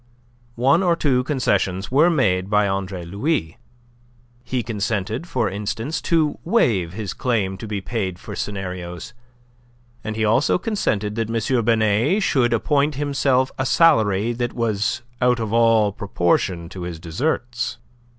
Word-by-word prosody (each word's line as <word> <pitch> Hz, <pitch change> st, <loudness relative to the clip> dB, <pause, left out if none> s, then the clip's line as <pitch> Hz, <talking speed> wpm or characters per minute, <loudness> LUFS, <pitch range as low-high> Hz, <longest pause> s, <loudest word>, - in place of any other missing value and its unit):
One 135 Hz, +9 st, +3 dB
or 175 Hz, -3 st, +3 dB
two 130 Hz, -6 st, +1 dB
concessions 100 Hz, -9 st, 0 dB
were 150 Hz, +6 st, +5 dB
made 95 Hz, -, +1 dB
by 105 Hz, -1 st, +3 dB
Andre 95 Hz, -2 st, -3 dB
Louis; 100 Hz, -, -2 dB, 0.8 s
he 125 Hz, 0 st, -2 dB
consented, 110 Hz, -, -2 dB
for 120 Hz, -9 st, 0 dB
instance, 110 Hz, +10 st, -3 dB
to 160 Hz, -3 st, +2 dB
waive 110 Hz, -, +1 dB
his 100 Hz, -2 st, -4 dB
claim 105 Hz, -7 st, -1 dB
to 110 Hz, -, -7 dB
be 105 Hz, -2 st, -3 dB
paid 95 Hz, -4 st, -3 dB
for -, -, -8 dB
scenarios, 90 Hz, -1 st, -5 dB, 0.9 s
and 110 Hz, 0 st, -4 dB
he 110 Hz, 0 st, 0 dB
also 115 Hz, +7 st, +3 dB
consented 110 Hz, -, -1 dB
that 115 Hz, -1 st, -1 dB
M. 115 Hz, +1 st, 0 dB
Binet 115 Hz, -, +2 dB
should 120 Hz, -7 st, +2 dB
appoint 145 Hz, +5 st, +1 dB
himself 135 Hz, -2 st, +1 dB
a 130 Hz, -, 0 dB
salary 115 Hz, -, +3 dB
that 120 Hz, 0 st, -3 dB
was 115 Hz, +1 st, -1 dB, 0.2 s
out 125 Hz, -1 st, +3 dB
of 110 Hz, -1 st, -3 dB
all 115 Hz, -3 st, +4 dB
proportion 90 Hz, -3 st, 0 dB
to 95 Hz, -, -8 dB
his 85 Hz, -2 st, -5 dB
deserts. 120 Hz, -, -2 dB
115 Hz, 140 wpm, -22 LUFS, 100-130 Hz, 0.9 s, were